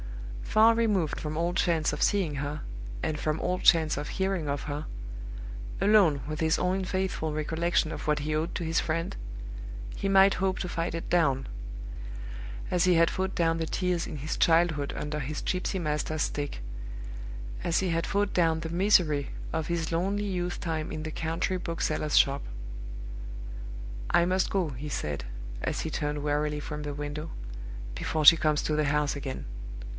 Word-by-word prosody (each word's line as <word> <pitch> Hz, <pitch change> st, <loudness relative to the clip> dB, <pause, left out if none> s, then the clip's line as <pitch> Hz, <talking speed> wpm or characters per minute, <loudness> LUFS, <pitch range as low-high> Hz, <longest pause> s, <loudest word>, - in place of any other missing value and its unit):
Far 220 Hz, -, +5 dB
removed 210 Hz, -9 st, +1 dB
from 155 Hz, 0 st, -3 dB
all 170 Hz, +1 st, +1 dB
chance 165 Hz, -5 st, +2 dB
of 150 Hz, -, -4 dB
seeing 190 Hz, -8 st, +2 dB
her, 145 Hz, +1 st, -3 dB, 0.4 s
and 155 Hz, -, -1 dB
from 155 Hz, +1 st, 0 dB
all 180 Hz, 0 st, 0 dB
chance 160 Hz, -5 st, +5 dB
of 145 Hz, -, -3 dB
hearing 190 Hz, -5 st, 0 dB
of 140 Hz, 0 st, -1 dB
her 150 Hz, 0 st, -3 dB, 0.9 s
alone 195 Hz, -8 st, +5 dB
with 155 Hz, +1 st, -3 dB
his 160 Hz, +1 st, +3 dB
own 185 Hz, +1 st, +1 dB
faithful 185 Hz, -4 st, -1 dB
recollection 160 Hz, +2 st, +1 dB
of -, -, -5 dB
what 150 Hz, -1 st, +2 dB
he 155 Hz, +1 st, -1 dB
owed 160 Hz, +3 st, 0 dB
to 170 Hz, -, -2 dB
his 160 Hz, +1 st, +2 dB
friend 165 Hz, +1 st, -1 dB, 0.8 s
he 195 Hz, -, -1 dB
might 195 Hz, 0 st, +7 dB
hope 190 Hz, -1 st, +1 dB
to -, -, -2 dB
fight 165 Hz, -1 st, -2 dB
it 165 Hz, -, -4 dB
down, 140 Hz, -7 st, +3 dB, 1.2 s
as 180 Hz, -2 st, +2 dB
he 180 Hz, -1 st, +5 dB
had 165 Hz, 0 st, +5 dB
fought 190 Hz, 0 st, -1 dB
down 165 Hz, -1 st, +2 dB
the 160 Hz, -, 0 dB
tears 180 Hz, 0 st, 0 dB
in 150 Hz, -, -5 dB
his 150 Hz, +3 st, -3 dB
childhood 165 Hz, -4 st, +3 dB
under 150 Hz, 0 st, -2 dB
his 150 Hz, +2 st, -3 dB
gypsy 185 Hz, +1 st, -1 dB
master's 155 Hz, -1 st, 0 dB
stick; 145 Hz, -, -3 dB, 1.0 s
as 170 Hz, -, +2 dB
he 190 Hz, -, 0 dB
had 165 Hz, 0 st, 0 dB
fought 200 Hz, 0 st, +1 dB
down 165 Hz, -2 st, +3 dB
the 165 Hz, 0 st, -4 dB
misery 170 Hz, -6 st, +3 dB, 0.2 s
of 160 Hz, -1 st, -1 dB
his 170 Hz, -1 st, -1 dB
lonely 195 Hz, +5 st, +1 dB
youth 180 Hz, -3 st, -2 dB
time 160 Hz, -3 st, -2 dB
in 155 Hz, -, -4 dB
the 155 Hz, -, -4 dB
country 165 Hz, +4 st, -1 dB
bookseller's 160 Hz, -3 st, 0 dB
shop. 140 Hz, 0 st, +5 dB, 1.7 s
"I 170 Hz, -, +5 dB
must 185 Hz, +1 st, +2 dB
go," 185 Hz, -5 st, +1 dB
he 145 Hz, +3 st, -5 dB
said, 75 Hz, -, -2 dB, 0.4 s
as -, -, -1 dB
he 160 Hz, -, -3 dB
turned 150 Hz, -1 st, -1 dB
wearily 150 Hz, 0 st, +1 dB
from 150 Hz, 0 st, -5 dB
the 145 Hz, -1 st, -3 dB
window, 145 Hz, +2 st, -4 dB, 0.7 s
"before 155 Hz, -1 st, -1 dB
she 165 Hz, -, +12 dB
comes 155 Hz, -2 st, +2 dB
to 155 Hz, -, +1 dB
the 155 Hz, 0 st, +2 dB
house 150 Hz, 0 st, +2 dB
again. 135 Hz, -2 st, -4 dB
160 Hz, 175 wpm, -29 LUFS, 150-180 Hz, 1.7 s, she